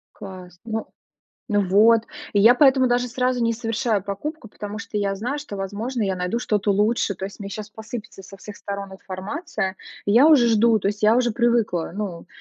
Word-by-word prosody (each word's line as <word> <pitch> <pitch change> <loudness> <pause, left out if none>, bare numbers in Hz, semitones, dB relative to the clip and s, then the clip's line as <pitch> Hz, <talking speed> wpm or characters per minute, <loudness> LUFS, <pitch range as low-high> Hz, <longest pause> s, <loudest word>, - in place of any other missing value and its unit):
Класс. 185 -2 -10
Ну 225 -1 -4 0.7
ну 205 -1 +2
вот. 220 +4 +5 0.3
И 205 - +2
я 230 +4 +7
поэтому 265 -1 +5
даже 245 0 +1
сразу 250 0 0
не 230 - +2
совершаю 225 -2 -1
покупку, 230 +7 -5
потому 210 +1 -7
что 215 - -7
я 200 -1 0
знаю, 250 +8 -3
что, 210 -9 -8
возможно, 215 +6 -3
я 195 -2 0
найду 180 +5 -2
что-то 210 -3 0
лучше. 210 0 +1
То 190 - -5
есть 200 - -8
мне 200 - -5
щас 210 +1 -6
посыпется 220 -2 -8
со 195 +1 -12
всех 205 +1 -10
сторон 200 -1 -6
информация, 190 - -4 0.3
я 240 +9 +6
уже 275 -7 +6
жду, 225 0 +4
то 195 - -3
есть 205 +1 -4
я 215 +2 +5
уже 245 -2 +2
привыкла. 235 -7 +1
Ну, 190 -4 -5
215 Hz, 195 wpm, -23 LUFS, 200-240 Hz, 0.7 s, я